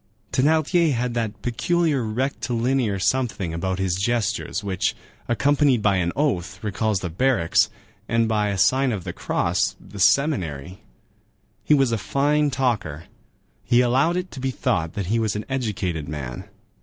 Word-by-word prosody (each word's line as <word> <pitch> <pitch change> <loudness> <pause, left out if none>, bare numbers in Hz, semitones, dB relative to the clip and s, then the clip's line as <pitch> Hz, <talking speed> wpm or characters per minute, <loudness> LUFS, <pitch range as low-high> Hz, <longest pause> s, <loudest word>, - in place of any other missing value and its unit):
Thénardier 155 +4 +3
had 125 0 -1
that 110 -3 -3
peculiar 150 +3 +1
rectilinear 120 -1 -1
something 100 -4 0
about 90 +3 -2
his 95 -2 0
gestures 115 +1 -1
which, 95 -2 -1 0.3
accompanied 135 -1 +2
by 100 -2 +3
an 85 -1 0
oath, 95 - -1
recalls 105 -1 -1
the 90 - -3
barracks, 105 -3 +2 0.4
and 115 0 +2
by 105 -1 +1
a 100 - -2
sign 130 +6 +3
of 100 -6 -3
the - - -5
cross, - - 0
the 100 - -12
seminary. 90 - +1 0.8
He 150 - +4
was 135 -4 +2
a 115 - 0
fine 145 +5 +1
talker. 110 - -1 0.6
He 120 +1 +4
allowed 135 +8 +2
it 180 0 -4
to 135 - -8
be 135 +1 -1
thought 105 -11 -1
that 100 - -3
he 110 +6 0
was 110 -2 0
an 105 - -4
educated 95 - -2
man. 65 -5 -6
115 Hz, 155 wpm, -23 LUFS, 95-135 Hz, 0.8 s, He